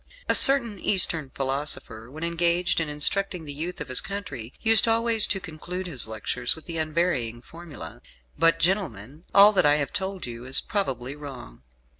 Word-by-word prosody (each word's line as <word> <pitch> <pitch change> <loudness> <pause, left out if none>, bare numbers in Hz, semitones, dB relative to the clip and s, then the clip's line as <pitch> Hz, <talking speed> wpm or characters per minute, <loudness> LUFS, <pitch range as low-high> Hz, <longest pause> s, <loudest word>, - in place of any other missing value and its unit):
A - - +3
certain 235 -7 +5
Eastern 165 -8 +2
philosopher, 135 -4 -3
when 155 +5 -9
engaged 170 +1 +1
in 160 -2 -2
instructing 170 +4 -1
the 145 - -5
youth 165 +5 -5
of - - -6
his 130 -1 +3
country, 145 - -7
used 225 0 +3
always 225 -1 +3
to 195 - -2
conclude 180 +2 -7
his 145 -10 -2
lectures 110 +3 -1
with 160 - -14
the 165 -2 -4
unvarying 155 -8 -1
formula, 145 - -11 0.3
"But, 165 0 +3
gentlemen, 160 - -2
all 200 +1 +8
that 195 - +2
I 145 - +5
have 145 -2 -2
told 190 -2 -3
you 120 -1 -8
is 130 +2 +2
probably 135 - -3
wrong." 135 - -10
160 Hz, 170 wpm, -25 LUFS, 135-190 Hz, 0.3 s, all